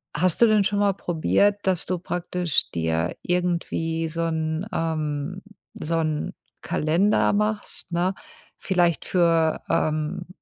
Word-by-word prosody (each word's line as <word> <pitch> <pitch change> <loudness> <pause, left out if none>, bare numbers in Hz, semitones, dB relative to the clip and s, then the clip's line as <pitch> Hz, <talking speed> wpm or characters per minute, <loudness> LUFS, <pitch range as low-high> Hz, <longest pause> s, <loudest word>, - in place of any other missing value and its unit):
hast 185 +2 +1
du - - +9
denn 215 -2 +4
schon 205 +1 0
mal 200 -1 +3
probiert, 195 +4 +1
dass 185 -3 +1
du 185 - -1
praktisch 175 -2 -1
dir 80 +1 -1
irgendwie 170 -2 -1
so 165 +1 -4
'n 160 +1 -1
ähm, 155 +1 -2 0.3
so 165 +2 -3
'n 155 -2 -2 0.3
Kalender 175 +9 +2
machst, 210 -3 0
ne? 175 +2 +1 0.5
Vielleicht 175 -3 +1
für 165 -3 +2
ähm, 155 0 -1
170 Hz, 125 wpm, -24 LUFS, 160-185 Hz, 0.5 s, du